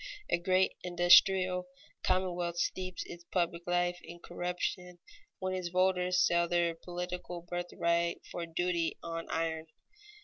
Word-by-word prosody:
A 170 - +3
great 185 +2 +2
industrial 180 +1 +5 0.3
commonwealth 180 -2 0
steeps 185 +1 -2
its 170 0 -10
public 170 -1 -1
life 175 0 +1
in 170 +1 -9
corruption 180 +1 -4 0.4
when 185 0 -2
its 185 -1 -2
voters 180 0 +3
sell 170 0 +3
their 170 -1 +2
political 180 0 -6
birthright 170 -1 -1
for 175 - -4
a 170 - -4
duty 170 0 -1
on 165 0 -5
iron. 160 -1 -2
175 Hz, 130 wpm, -32 LUFS, 170-180 Hz, 0.4 s, industrial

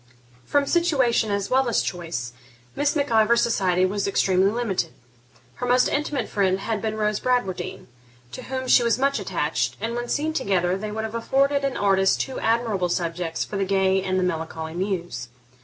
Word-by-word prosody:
From 285 -1 +2
situation 275 -10 +2
as 200 +1 -2
well 260 -1 +3
as 230 - +1
choice, 165 -10 -4 0.4
Miss 290 +1 +1
Mac 285 -2 0
Ivor's 225 +1 +4
society 185 -5 +2
was 200 +2 -1
extremely 190 -1 +3
limited. 210 -7 -1 0.7
Her 250 - -3
most 250 +1 +4
intimate 290 -5 -1
friend 190 -2 +1
had 215 +1 -2
been 220 -1 -2
Rose 210 -1 0
Bradwardine, 245 -8 -2 0.5
to 130 - -8
whom 260 0 -4
she 250 - +6
was 235 -1 +2
much 275 -1 +1
attached; 150 -10 -1
and 225 +2 -3
when 240 0 -4
seen 310 +2 0
together, 185 - +1
they 210 +2 -5
would 220 +1 -3
have 220 0 -5
afforded 275 +4 +1
an 275 -1 -1
artist 195 -1 +3
two 265 - -3
admirable 225 -6 0
subjects 170 -1 -2
for 205 - -5
the 195 - +1
gay 190 0 +2
and 185 0 -1
the 185 - +1
melancholy 160 -2 -3
muse. 175 -9 -3
205 Hz, 180 wpm, -24 LUFS, 185-245 Hz, 0.7 s, she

